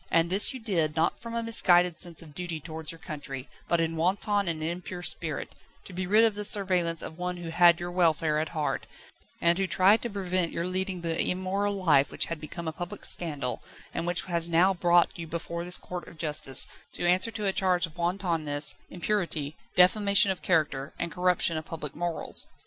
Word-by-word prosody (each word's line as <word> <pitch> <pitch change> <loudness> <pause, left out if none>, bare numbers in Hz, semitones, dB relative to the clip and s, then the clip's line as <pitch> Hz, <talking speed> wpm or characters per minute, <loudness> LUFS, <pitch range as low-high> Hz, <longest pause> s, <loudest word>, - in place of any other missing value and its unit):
And 165 +1 +2
this 195 +2 +5
you 260 - -7
did, 170 -9 0
not 165 +1 +1
from 230 0 -6
a 230 - -1
misguided 180 -6 +3
sense 170 -2 -2
of 155 -3 -14
duty 170 0 -4
towards 160 0 -6
your 165 - -11
country, 145 -5 -7 0.2
but 170 - +2
in 165 0 0
wanton 200 +4 +1
and 160 -2 -2
impure 175 +1 -4
spirit, 155 -4 -2 0.3
to 190 - -11
be 185 +1 -3
rid 215 +4 +5
of 225 - +2
the 210 +1 -5
surveillance 185 -5 +2
of 160 - -8
one 180 0 -3
who 170 -1 -6
had 170 0 +6
your 175 0 -4
welfare 160 -3 +2
at 155 0 -2
heart, 155 -2 -2 0.5
and 170 +2 +3
who 195 - +1
tried 195 +5 +4
to 240 - -3
prevent 185 -4 -1
your 170 - -2
leading 185 0 -1
the 165 -1 0
immoral 195 +2 -1
life 140 -5 +4
which - - 0
had 165 -2 -6
become 165 +2 -7
a - - -1
public 175 +1 -6
scandal, 145 -7 -1 0.3
and 170 - -3
which 175 +1 0
has 170 -2 +2
now 175 +4 +4
brought 175 -1 +3
you 165 - -5
before 170 +1 -4
this 180 +1 0
court 180 -1 -7
of 170 - -13
justice, 150 -4 0 0.3
to - - -2
answer 180 +5 +3
to 215 -2 -4
a 195 - +1
charge 180 -3 +2
of 165 -1 -13
wantonness, 170 -5 -1 0.2
impurity, 170 -5 -2 0.2
defamation 200 +2 +5
of 190 - -5
character, 155 -5 0
and 170 - -3
corruption 180 -2 +1
of 155 - -5
public 150 -4 -6
morals. 170 0 -1
175 Hz, 205 wpm, -28 LUFS, 160-185 Hz, 0.5 s, had